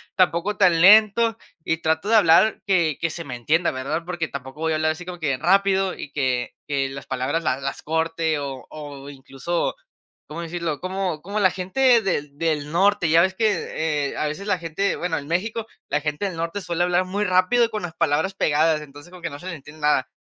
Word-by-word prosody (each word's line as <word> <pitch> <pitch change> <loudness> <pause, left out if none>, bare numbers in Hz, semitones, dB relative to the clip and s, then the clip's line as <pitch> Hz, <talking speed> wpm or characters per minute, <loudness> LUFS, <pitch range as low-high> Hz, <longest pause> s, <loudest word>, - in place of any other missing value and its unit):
tampoco 185 +2 +1
tan 175 -4 +4
lento, 220 +4 +6 0.3
y 160 - 0
trato 160 +4 -1
de 225 - +4
hablar, 210 +1 +5
que 170 -6 +2
que 165 - 0
se 170 +2 -5
me 135 -5 -6
entienda, 160 +8 +1
¿verdad? 140 +6 -3
Porque 175 -2 -3
tampoco 135 0 -8
voy 160 0 0
a - - +1
hablar, 155 0 +1
así 165 +3 -7
como 180 -1 -7
que 145 -5 0
rápido, 190 +4 +2
y 145 - -8
que 130 -4 -1
que 140 -2 -1
las 140 +1 -9
palabras 135 +5 -1
las 130 +1 0
las 135 0 -4
corte, 160 0 -1
o 135 -2 -6
o 145 -2 -9
incluso 135 +4 -3 0.6
¿Cómo 165 +3 -5
decirlo? 170 -3 -3
Como 185 -4 -3
como 205 +4 -3
la 185 -2 +5
gente 235 +6 +3
del 150 -7 -2
del 150 -2 -1
norte. 190 +1 +2
Ya 165 +2 +5
ves 190 +1 +2
que, 160 -8 -1
eh, - - -8
a - - 0
veces, 155 +7 -5
la 200 -3 +1
gente 170 +4 -1
bueno, 175 -2 -2
en 145 -2 -6
México. 215 +7 -2 0.2
La 150 - 0
gente 150 +6 -2
del 185 -4 -5
norte, 165 +4 -3
suele 175 -2 -2
hablar 180 +1 +1
muy 200 +3 -1
rápido, 185 +6 +3
y 230 - -2
con 215 -1 -3
las 175 -3 -6
palabras 160 +7 0
pegadas. 155 -2 +2
Entonces, 145 +2 -13
como 180 -1 -13
que 170 - -3
no 145 - -8
se 175 - -12
le 185 - -4
entiende 150 +1 -13
nada. 150 -3 +2
165 Hz, 220 wpm, -23 LUFS, 150-185 Hz, 0.6 s, lento